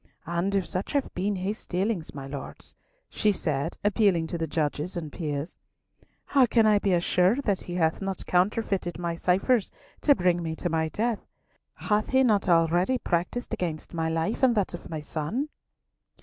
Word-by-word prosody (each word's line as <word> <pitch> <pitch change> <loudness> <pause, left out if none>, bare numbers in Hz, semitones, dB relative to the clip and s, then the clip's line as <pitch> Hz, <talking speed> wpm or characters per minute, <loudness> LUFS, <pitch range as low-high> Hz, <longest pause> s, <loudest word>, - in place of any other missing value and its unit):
And 175 +4 -1
if 195 -2 +1
such 185 +9 -3
have 280 -2 0
been 195 +3 -1
his 195 +4 -4
dealings, 185 -3 -2
my 140 -1 -6
Lords," 135 0 -8 0.3
she 215 - +1
said, 155 -4 -2
appealing 200 -5 +3
to 165 +2 -4
the 165 - -1
judges 150 +3 -2
and 155 -3 -5
peers, 150 -1 -4 0.7
"how 270 -3 +4
can 225 -1 +4
I 210 -1 +5
be 200 -2 +1
assured 180 +8 +2
that 200 -6 0
he 175 - -6
hath 160 0 +1
not 195 -1 -4
counterfeited 185 -1 0
my 170 -1 -2
ciphers 190 +7 +2 0.3
to 285 - +5
bring 180 -3 +2
me 160 -1 -3
to 175 - -2
my 160 -1 0
death? 225 +4 -1 0.5
Hath 210 0 0
he 265 0 +4
not 210 -6 +2
already 175 +8 +3
practised 190 +5 -2
against 170 -8 -3
my 165 -1 -1
life 165 +10 -1
and 255 -3 +4
that 200 -4 0
of 175 - -8
my 160 -2 -4
son?" 165 - -3
180 Hz, 180 wpm, -27 LUFS, 165-210 Hz, 0.7 s, I